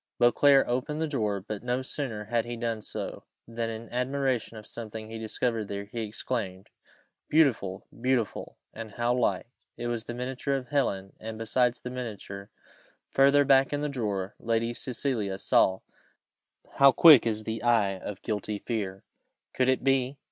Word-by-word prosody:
Beauclerc 135 +3 +5
opened 130 +5 -1
the 160 - 0
drawer, 105 -9 -1
but 105 +1 -6
no 125 +1 -1
sooner 120 -6 -4
had 115 +1 0
he 120 0 -6
done 115 -2 -2
so, - - -6 0.2
than, 115 0 -3
in 115 +1 -6
admiration 125 -2 -1
of 105 - -10
something 110 -1 -7
he 115 - -5
discovered 110 0 -2
there, 100 0 -4
he 115 +3 -5
exclaimed, 105 -3 -4 0.6
"Beautiful! 115 -12 +2
beautiful! 125 -2 -1 0.2
and 110 -2 -8
how 120 +2 +1
like!" 115 -7 +1 0.3
It 120 - -5
was 120 -1 -3
the 120 - -5
miniature 130 +3 -2
of 130 -3 -4
Helen, 100 -9 0
and 110 0 -6
besides 120 +2 +1
the 125 - -6
miniature, 105 -5 -6 0.6
further 140 +1 +5
back 135 -1 +5
in 145 0 -1
the 150 - -1
drawer, 105 -7 -2
Lady 115 +1 0
Cecilia 120 -6 -2
saw 95 -1 +3 1.0
how 140 0 +8
quick 145 -2 +8
is 110 -1 -1
the 110 +1 -4
eye 105 -5 +2
of 100 +1 -7
guilty 105 -1 -2
fear! 100 -4 -4 0.5
could 130 0 +2
it 130 - +1
be? 135 0 +1
115 Hz, 160 wpm, -28 LUFS, 105-130 Hz, 1.0 s, how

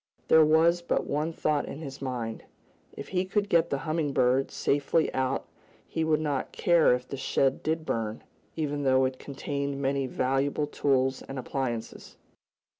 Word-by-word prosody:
There 160 - +7
was 165 +3 +4
but 170 - -1
one 150 +3 -1
thought 150 -2 0
in - - -6
his 135 -3 -8
mind. 120 -4 -4 0.5
If - - -7
he 180 -1 0
could 205 +2 -1
get 170 -2 +3
the 140 - 0
Humming 155 -2 -1
Bird 130 +2 +2
safely 145 +3 +1
out 130 +1 -1 0.4
he 160 - -2
would 155 -1 +2
not 145 -4 -2
care 170 -7 +4
if 125 0 -7
the 140 - -5
shed 135 0 +1
did 160 0 -1
burn, 110 -4 -3 0.3
even 145 -2 -2
though 130 -1 +3
it 130 0 -3
contained 140 0 -4
many 135 -1 0
valuable 135 +4 0
tools 135 -2 +1
and 135 - -8
appliances. 125 -3 -4
140 Hz, 165 wpm, -28 LUFS, 130-155 Hz, 0.5 s, There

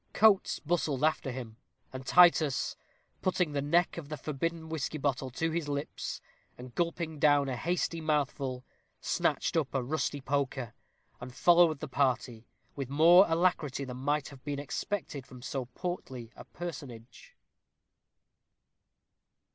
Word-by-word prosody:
Coates 210 -3 +4
bustled 150 -4 -1
after 155 -3 +1
him, 120 -3 -7 0.4
and 130 0 -6
Titus, 170 -5 +5 0.5
putting 180 -3 +1
the 145 -1 -1
neck 170 +4 +2
of 145 -3 -10
the 155 - -4
forbidden 160 +4 -3
whisky 160 -1 -3
bottle 135 -2 -1
to 160 +6 -2
his 165 -2 -2
lips, 145 0 -4 0.4
and 125 0 -10
gulping 170 -2 -2
down 145 -1 +4
a 130 - -2
hasty 170 +3 -1
mouthful, 140 -4 -1 0.3
snatched - - 0
up 150 -4 0
a 130 - +1
rusty 145 +1 -1
poker, 135 -3 -2 0.5
and 125 0 -9
followed 170 -4 +5
the - - -4
party 125 -4 -1 0.3
with 135 -3 -4
more 170 +7 +7
alacrity 165 -5 +1
than 125 -2 -6
might 145 +2 -1
have 135 -3 -14
been 145 -1 -3
expected 145 -1 -4
from 125 -1 -12
so 135 -1 -3
portly 125 -4 -6
a - - -11
personage. 145 - -9
145 Hz, 140 wpm, -30 LUFS, 130-165 Hz, 0.5 s, more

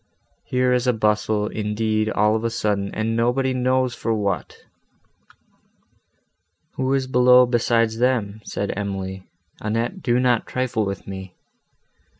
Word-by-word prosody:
Here 125 0 +1
is 125 0 +1
a 125 - +4
bustle, 105 -1 +1
indeed, 110 0 -1
all 105 0 +2
of 110 - -2
a 115 - +1
sudden, 105 -4 -1
and 110 +1 -1
nobody 125 +3 +1
knows 130 0 +1
for 115 -1 -2
what!" 100 -3 -2 2.2
"Who 130 0 -1
is 135 -1 0
below 125 0 +6
besides 115 -2 +1
them?" 110 -5 0
said 100 - -3
Emily, 95 -2 -5 0.3
"Annette, 115 - -2
do 120 0 +1
not 125 -3 +2
trifle 125 -4 -1
with 100 -1 -5
me!" 95 -1 -8
115 Hz, 135 wpm, -22 LUFS, 105-125 Hz, 2.2 s, below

